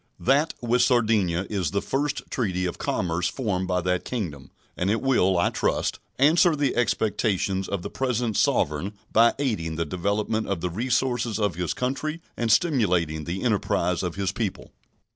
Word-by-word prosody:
That 145 +5 +2
with 120 +1 +2
Sardinia 110 -8 +2
is 95 -7 -1
the 100 - 0
first 145 +6 -2
treaty 95 -7 -1
of 90 - -4
commerce 90 -1 -1
formed 95 -8 -2
by 90 -1 0
that 90 0 0
Kingdom, 80 - -5 0.3
and 90 - -1
it 110 +2 +2
will, 95 -9 +2
I 85 - +2
trust, - - -1 0.2
answer 160 +4 +5
the 145 -2 0
expectations 100 -5 0
of 100 -3 -3
the - - -4
present 125 -4 -1
Sovereign 75 +6 +1 0.2
by 115 +1 +5
aiding 105 - -1
the 85 +1 -1
development 100 +6 -1
of 100 -3 -1
the 90 - -2
resources 120 +1 0
of 105 -4 0
his 85 +1 -2
country 145 +5 -2 0.2
and 115 -1 0
stimulating 90 - +2
the 90 +3 -4
enterprise 90 -6 +1
of 90 -2 -3
his 100 -2 -1
people. 100 -2 -4
105 Hz, 165 wpm, -25 LUFS, 90-125 Hz, 0.3 s, answer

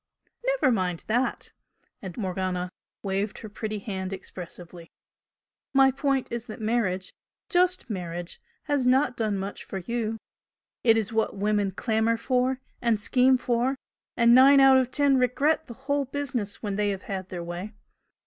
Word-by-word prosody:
"Never - - +2
mind 180 -6 -1
that!" 245 +4 -1 0.5
and 185 -3 -8
Morgan 185 -3 -2 0.3
waved 200 +1 -2
her 215 - -8
pretty 215 0 -4
hand 190 -2 -4
expressively 175 -2 -9 0.9
"My 270 0 +6
point 275 -1 0
is 235 +1 -4
that 215 - -8
marriage 215 -5 -1 0.4
just 360 0 +2
marriage 175 -4 -5 0.2
has 290 -3 0
not 255 +1 +3
done 215 -4 -1
much 195 +1 -5
for 195 - -6
you. 225 +3 -2 0.7
It 225 -2 +5
is 220 -1 -1
what 220 -1 0
women 205 0 +1
clamour 220 +3 0
for, 255 +1 0 0.2
and 235 -3 +2
scheme 255 +4 +4
for, 245 +2 0 0.4
and 235 0 +6
nine 270 +2 +8
out 270 -1 +7
of 255 -1 +2
ten 280 -1 +3
regret 290 +6 +1
the 235 - -9
whole 285 0 +1
business 255 -7 -4
when 205 -2 -2
they 210 -1 +1
have 195 -1 -3
had 190 -2 -5
their 175 -2 -5
way. 175 +5 -6
225 Hz, 155 wpm, -26 LUFS, 195-260 Hz, 0.9 s, nine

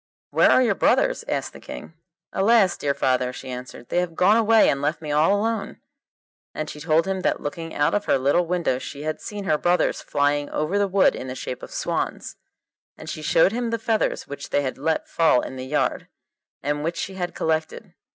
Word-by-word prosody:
'Where - - +5
are 255 - +5
your 230 -5 +2
brothers?' 185 - +2
asked - - -2
the - - -11
King. - - -9 0.4
'Alas! 200 -1 +4
dear 140 -1 -1
father,' 130 -1 +1
she 130 - -9
answered, 125 -1 -9
'they 175 - +1
have 175 -2 -2
gone 190 +5 +4
away 225 -1 +5
and 140 - +1
left 150 +2 -1
me 155 -2 -5
all 160 +7 +3
alone.' 220 -1 -2 0.8
And 155 0 -4
she 150 - -10
told 160 +1 +2
him 190 0 -2
that - - 0
looking 165 +3 -6
out 145 0 +2
of 205 0 0
her - - +3
little 145 +6 +2
window 170 -7 0
she 140 +2 -7
had 155 0 -3
seen 205 -1 -6
her 155 -5 +1
brothers 175 +1 +1
flying 145 0 0
over 165 +7 -1
the 200 - +2
wood 195 0 +4
in 130 - -6
the 130 - -5
shape 125 -1 -6
of - - -9
swans, - - -3 0.6
and - - -7
she 155 - -6
showed 160 +4 +4
him 235 +1 -2
the 230 - -1
feathers 225 -1 -1
which 145 0 -7
they 145 - +1
had 130 -1 -4
let 160 +3 -1
fall 160 -6 +3
in - - -7
the 130 0 -6
yard, 150 +2 -1 0.6
and 145 +1 -1
which 165 +2 -2
she 195 - -4
had 180 -2 -4
collected. 160 0 -2
160 Hz, 215 wpm, -23 LUFS, 145-195 Hz, 0.8 s, Where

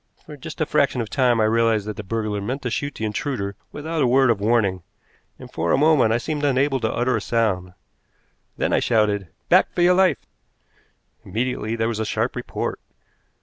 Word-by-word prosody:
For 150 - -10
just 155 +3 -9
a 155 - +1
fraction 140 -3 +1
of 115 -3 -4
time 125 -4 +2
I - - +3
realized 110 -1 +2
that 105 -1 -5
the 105 - -6
burglar 105 0 -3
meant 130 +7 -4
to 125 - -2
shoot 145 +4 -3
the 110 - -3
intruder 105 -3 -3 0.2
without 155 +2 -3
a 130 - +3
word 130 0 +4
of 110 - -1
warning, 105 -4 +1 0.6
and - - -13
for 85 +1 -1
a - - +4
moment 145 -6 +4
I 115 - +3
seemed 150 +4 -4
unable 135 0 +2
to 110 -2 -1
utter 125 +2 0
a - - -1
sound. 95 -6 -1 0.8
Then - - 0
I - - +4
shouted: 105 -4 +1 0.2
"Back - - +4
for 175 - +2
your 180 +1 +5
life!" 185 0 +2 1.0
Immediately 115 +1 -2
there 115 0 0
was 115 -2 -3
a 110 - -1
sharp - - -1
report. - - -4
115 Hz, 200 wpm, -22 LUFS, 105-140 Hz, 1.0 s, your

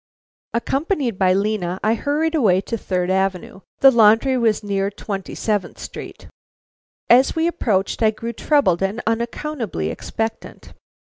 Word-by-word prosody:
Accompanied 270 - -1
by 185 -1 +4
Lena, 195 -2 -1
I 215 +2 +3
hurried 300 +7 -1
away 210 - +3
to 230 - -4
Third 185 -4 -2
Avenue. 190 -1 -1 0.2
The 270 - +8
laundry 230 +3 +4
was 225 -4 +1
near 200 -1 -1
Twenty 200 -1 -6
seventh 205 -5 -2
Street. - - -9 0.8
As 255 +6 +5
we 325 0 +1
approached 220 - 0
I 220 - +5
grew 230 +2 -5
troubled 235 - +2
and 195 +4 -1
unaccountably 230 - -2
expectant. 225 - -6
220 Hz, 135 wpm, -20 LUFS, 195-255 Hz, 0.8 s, The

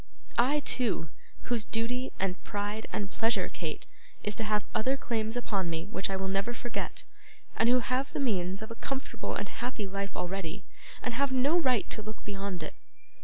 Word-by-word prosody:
I, 280 +5 +5
too, 225 - +3 0.3
whose 240 -3 +2
duty, 245 +4 0
and 190 -1 0
pride, 205 +2 -2
and 200 -2 -1
pleasure, 225 +1 +3
Kate, - - -4 0.4
it - - -7
is - - +3
to 220 - -1
have 210 -1 +2
other 255 +5 +2
claims 225 -2 0
upon 195 -7 0
me 165 0 -1
which 195 -1 -1
I 195 - 0
will 190 0 -1
never 195 +5 +1
forget; 240 0 -3 0.5
and 225 - +5
who 250 0 +6
have 255 +3 0
the - - -2
means 195 -6 +1
of 220 - -7
a 230 - -8
comfortable 270 0 -2
and - - -1
happy 245 -4 -3
life 200 0 -3
already, 180 -2 -2 0.4
and 245 - 0
have 275 +3 +2
no 260 +5 +4
right 255 - +3
to - - -1
look 215 0 -7
beyond 195 -4 -2
it! 155 - -5
220 Hz, 190 wpm, -31 LUFS, 195-245 Hz, 0.5 s, who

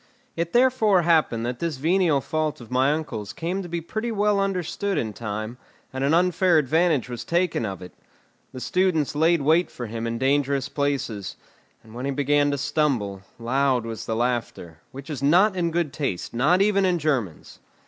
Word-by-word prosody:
It 170 0 -2
therefore 240 -7 +3
happened 155 -9 +2
that 120 0 -4
this 165 -5 -2
venial 165 -1 +2
fault 155 -1 -2
of 120 0 -13
my 130 +2 +3
uncle's 115 -9 -4
came 175 +8 -3
to 175 - -8
be 170 0 -3
pretty 220 +8 -4
well 210 -1 +1
understood 195 +1 -1
in 110 -2 -2
time, 110 +2 -5 0.3
and 130 0 -3
an 140 - +2
unfair 180 0 +3
advantage 155 -1 +2
was 120 -2 -6
taken 170 -9 0
of 95 -2 -6
it; 90 - -11 0.6
the 130 - -8
students 160 +3 +1
laid 160 +1 +2
wait 160 +5 +3
for 120 - -7
him 115 +1 -4
in 115 0 -2
dangerous 140 +1 +1
places, 135 -9 -2 0.5
and 110 - -16
when 125 +3 -5
he 140 - -1
began 145 +1 +2
to 140 - -1
stumble, 130 -9 -1 0.2
loud 130 +1 +1
was 115 -1 -6
the 110 - -1
laughter, 115 -9 -3
which 135 +1 -10
is 145 -5 -5
not 185 +8 +4
in 175 -2 0
good 165 -4 -1
taste, 135 - -3
not 155 +11 +3
even 200 -1 +2
in 180 -2 +2
Germans. 135 - -2
145 Hz, 185 wpm, -24 LUFS, 120-175 Hz, 0.6 s, not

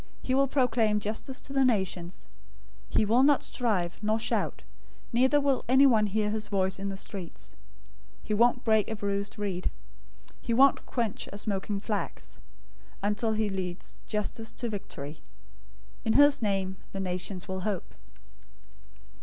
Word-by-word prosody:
He 255 - -1
will 275 +1 +4
proclaim 230 -6 +2
justice 220 +6 -3
to 275 - -7
the 270 -1 +3
nations. 185 - 0 0.6
012:019 - - 0
He 215 - +4
will 230 +5 +4
not 285 +1 +4
strive, 195 -9 -1
nor 215 +1 +1
shout; 225 -2 -1 0.5
neither 260 +5 +4
will 275 -2 +1
anyone 255 -5 +6
hear 210 +1 0
his 215 0 0
voice 190 -1 0
in 200 0 -3
the 195 - -5
streets. 175 - -7 0.7
012:020 - - -18
He - - 0
won't 240 +3 +3
break 220 -2 +3
a 220 - -2
bruised 200 -1 -2
reed. 195 -3 -2 0.7
He 230 - -1
won't 275 +2 +5
quench 230 -5 -2
a 200 - -7
smoking 200 0 -1
flax, 150 - -4 0.6
until 210 +2 +1
he 215 0 +1
leads 185 -2 -5
justice 215 +1 -2
to 240 - -3
victory. 155 -8 -6 0.8
012:021 - - -27
In 220 - +3
his 290 -1 +6
name, 195 -3 -1 0.2
the 195 - -4
nations 185 0 -3
will 190 -1 -3
hope." 190 -1 -3
210 Hz, 155 wpm, -29 LUFS, 195-235 Hz, 0.8 s, anyone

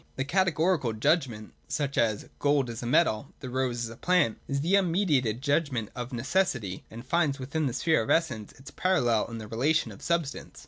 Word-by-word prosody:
The 135 - -2
Categorical 165 - +1
judgment 115 -2 0
(such 140 -2 -2
as 110 -3 +1
' - - -36
Gold 140 -4 +2
is 115 - -7
a 120 - -4
metal,' 125 -3 +2
'The 130 -3 -7
rose 125 -2 -1
is 115 - -3
a - - -9
plant') 180 -5 +2
is 140 0 -1
the 175 +6 +3
un 195 -3 +3
mediated 135 - +1
judgment 140 -7 0
of 125 +1 -5
necessity, 125 - -1
and 115 +3 -10
finds 150 -1 +1
within 140 +3 -2
the 125 - -2
sphere 160 +4 +2
of 110 - -5
Essence 115 -10 +1
its 135 +3 -13
parallel 125 - +1
in 115 - -7
the 110 -1 -7
relation 135 +9 +1
of - - -12
substance. 170 -5 -2
135 Hz, 200 wpm, -28 LUFS, 115-160 Hz, -, the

